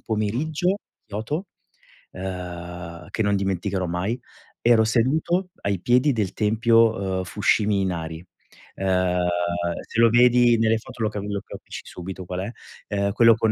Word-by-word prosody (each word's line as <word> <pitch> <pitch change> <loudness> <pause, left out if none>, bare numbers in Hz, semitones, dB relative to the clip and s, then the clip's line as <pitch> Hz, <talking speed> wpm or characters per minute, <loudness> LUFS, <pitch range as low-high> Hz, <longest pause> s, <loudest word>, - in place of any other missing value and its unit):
pomeriggio, 145 - 0 0.3
Kyoto, 115 - -3 0.7
uhm, 90 -2 -7
che - - -1
non 100 -1 +2
dimenticherò 95 0 -1
mai, 90 +8 -2 0.4
ero 115 -1 +5
seduto 155 - +1
ai 100 -2 -1
piedi 125 +6 +3
del 105 -5 -1
tempio, 110 -3 +3
ehm, - - -2
Fushimi 105 +2 +2
Inari 85 -3 -3 0.5
uhm, 90 -1 +1 0.7
se - - -3
lo 115 0 +7
vedi 120 0 +5
nelle 115 0 +3
foto 120 0 -7
lo 110 - +2
capi 105 -1 -5
lo 100 -1 -2
capisci - - -9
subito 95 +1 -7
qual 90 +1 -4
è, 100 +4 -4 0.5
uhm, 100 0 +1
quello 115 +1 +6
con 110 -1 +1
105 Hz, 140 wpm, -24 LUFS, 95-115 Hz, 0.7 s, lo